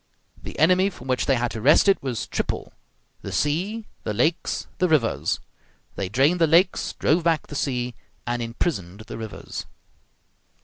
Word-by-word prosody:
The - - -8
enemy 185 +5 +4
from 135 -9 -12
which 130 -1 0
they 135 - +4
had 120 -1 -1
to 110 - -5
wrest 150 - +6
it 195 - +4
was 130 -4 -3
triple: - - -3 0.5
the - - -6
sea, 190 +10 -1 0.2
the 105 - -3
lakes, 155 +9 0
the 180 - +3
rivers. 140 -8 +1 0.6
They 95 -2 -3
drained 140 - +3
the 165 - +6
lakes, 170 +4 +3
drove 165 +3 +2
back 165 -2 +2
the 145 - -9
sea, 125 -3 -1 0.3
and 120 0 -1
imprisoned 115 - -3
the 110 - -8
rivers. 110 -2 -7
140 Hz, 165 wpm, -24 LUFS, 120-170 Hz, 0.6 s, wrest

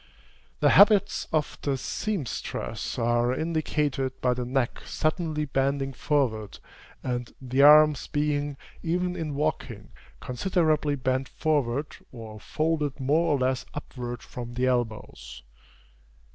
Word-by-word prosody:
The - - +5
habits 205 0 +5
of 155 -2 -1
the 140 -2 0
seamstress 180 - -4
are 120 +1 +2
indicated 150 -4 -1
by 125 -1 +2
the 125 0 -3
neck 130 0 -1
suddenly 155 -1 -1
bending 135 0 0
forward, 115 -5 -1 0.5
and 125 -1 -3
the 130 +1 0
arms 150 0 +7
being, 145 -1 -1 0.2
even 180 +2 -1
in 155 -5 -4
walking, 150 +2 -3 0.3
considerably 150 +3 0
bent 130 0 -1
forward 145 -2 -1
or 110 -3 -9
folded 150 +1 -1
more 155 +4 +2
or - - +2
less 130 0 0
upward 120 -4 -6
from 120 -1 -8
the 125 +1 +1
elbows. 110 - -3
140 Hz, 115 wpm, -27 LUFS, 125-155 Hz, 0.5 s, arms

